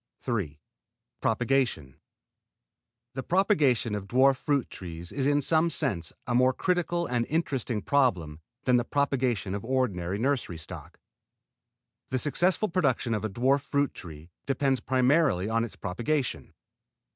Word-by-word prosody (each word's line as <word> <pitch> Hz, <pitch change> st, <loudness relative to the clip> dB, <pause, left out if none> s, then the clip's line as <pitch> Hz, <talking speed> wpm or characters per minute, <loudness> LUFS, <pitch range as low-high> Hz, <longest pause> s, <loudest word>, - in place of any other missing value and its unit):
III 95 Hz, -, -2 dB, 0.6 s
PROPAGATION 115 Hz, -, 0 dB, 1.2 s
The 135 Hz, -, -4 dB
propagation 150 Hz, -, +2 dB
of 100 Hz, -1 st, -4 dB
dwarf 130 Hz, +3 st, +4 dB
fruit 140 Hz, -3 st, 0 dB
trees 85 Hz, -1 st, -7 dB
is 135 Hz, -1 st, -1 dB
in 145 Hz, 0 st, +3 dB
some 160 Hz, +3 st, +3 dB
senses 115 Hz, -, -1 dB
a 125 Hz, -, -2 dB
more 130 Hz, +1 st, +4 dB
critical 175 Hz, +1 st, 0 dB
and 120 Hz, -4 st, 0 dB
interesting 130 Hz, -, -1 dB
problem 90 Hz, -, +1 dB, 0.2 s
than 125 Hz, -1 st, +4 dB
the 120 Hz, -, +1 dB
propagation 125 Hz, -8 st, 0 dB
of 100 Hz, -, -4 dB
ordinary 100 Hz, -8 st, -1 dB
nursery 120 Hz, -7 st, -1 dB
stock. 80 Hz, -, -10 dB, 1.1 s
The 130 Hz, -, 0 dB
successful 175 Hz, -, +1 dB
production 140 Hz, -, 0 dB
of 105 Hz, -1 st, -2 dB
a 110 Hz, -, -1 dB
dwarf 130 Hz, +7 st, +2 dB
fruit 140 Hz, 0 st, 0 dB
tree 80 Hz, 0 st, -11 dB, 0.2 s
depends 135 Hz, -1 st, +1 dB
primarily 130 Hz, -, +2 dB
on 115 Hz, +1 st, +1 dB
its 110 Hz, -5 st, -6 dB
propagation. 120 Hz, +10 st, -3 dB
125 Hz, 135 wpm, -28 LUFS, 100-140 Hz, 1.2 s, dwarf